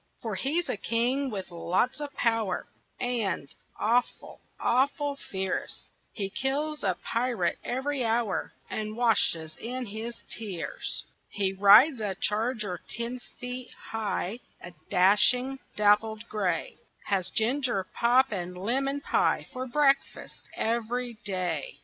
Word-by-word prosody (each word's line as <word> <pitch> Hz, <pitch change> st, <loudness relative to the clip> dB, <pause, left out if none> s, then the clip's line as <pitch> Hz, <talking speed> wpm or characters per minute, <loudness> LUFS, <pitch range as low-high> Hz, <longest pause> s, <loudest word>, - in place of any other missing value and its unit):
For 225 Hz, -2 st, -2 dB
he's 285 Hz, -, 0 dB
a -, -, -1 dB
king 245 Hz, +6 st, +1 dB
with 195 Hz, -5 st, -5 dB
lots 175 Hz, -, 0 dB
of 290 Hz, -1 st, -4 dB
power 225 Hz, -5 st, +1 dB, 0.3 s
And 230 Hz, -, -1 dB, 0.3 s
awful, 240 Hz, +3 st, 0 dB, 0.2 s
awful 280 Hz, +3 st, +2 dB
fierce, 190 Hz, -7 st, -3 dB, 0.3 s
He 195 Hz, -3 st, -3 dB
kills 295 Hz, +6 st, -1 dB
a 185 Hz, -3 st, +1 dB
pirate 230 Hz, -7 st, 0 dB
every 265 Hz, +2 st, -1 dB
hour 225 Hz, -3 st, 0 dB, 0.2 s
And 215 Hz, 0 st, -4 dB
washes 170 Hz, -9 st, +2 dB
in 250 Hz, +2 st, -4 dB
his 225 Hz, +3 st, -6 dB, 0.2 s
tears. 200 Hz, -7 st, -3 dB, 0.2 s
He 195 Hz, -2 st, 0 dB
rides 215 Hz, +7 st, +7 dB
a 200 Hz, -3 st, -1 dB
charger 210 Hz, -4 st, 0 dB
ten 235 Hz, +2 st, -3 dB, 0.2 s
feet 250 Hz, 0 st, -5 dB, 0.2 s
high, 220 Hz, 0 st, -2 dB, 0.2 s
A 175 Hz, -, -9 dB, 0.2 s
dashing, 245 Hz, +8 st, +4 dB, 0.2 s
dappled 210 Hz, +2 st, +3 dB
gray; 185 Hz, -6 st, -1 dB, 0.3 s
Has 190 Hz, -3 st, +1 dB
ginger 240 Hz, -3 st, +1 dB
pop 250 Hz, +2 st, +4 dB
and 180 Hz, -2 st, -4 dB
lemon 270 Hz, +8 st, 0 dB
pie -, -, +2 dB
For 255 Hz, 0 st, -4 dB
breakfast 275 Hz, +1 st, +1 dB
every 235 Hz, +1 st, -1 dB
day. 180 Hz, -7 st, -2 dB
225 Hz, 120 wpm, -28 LUFS, 195-255 Hz, 0.3 s, rides